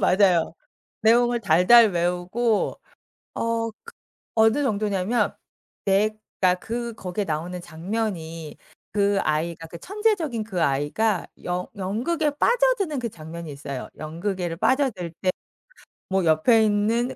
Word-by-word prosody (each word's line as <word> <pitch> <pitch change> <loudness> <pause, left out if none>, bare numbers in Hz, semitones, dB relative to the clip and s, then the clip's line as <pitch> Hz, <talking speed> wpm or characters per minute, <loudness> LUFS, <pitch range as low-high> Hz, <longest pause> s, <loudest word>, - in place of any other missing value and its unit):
맞아요. 185 -4 +3 0.5
내용을 240 +1 +4
달달 220 +3 +6
외우고 180 +6 0 0.6
어 230 0 -1
그 470 - -12 0.4
어느 225 +5 +4
정도냐 210 -5 0
하면 220 +7 0 0.5
백 210 +2 +2 0.2
그러니까 180 -1 +3
그 235 +2 -4
거기에 195 -1 -4
나오는 170 +2 -3
장면이 170 -2 -4 0.3
그 200 -1 +2
아이가 165 +2 -1
그 170 +1 -10
천재적인 380 - 0
그 190 -5 -3
아이가 145 +9 +1 0.2
연 180 +1 -2
연극에 240 - -1
빠져드는 420 - +2
그 235 -1 -3
장면이 165 -2 -8
있어요. 140 -2 -6
연극에를 170 +2 -3
빠져들 240 - +1
때 185 - +2 0.8
뭐 190 0 +1
옆에 170 +8 +4
있는 220 +4 +1
200 Hz, 265 characters per minute, -24 LUFS, 175-235 Hz, 0.8 s, 달달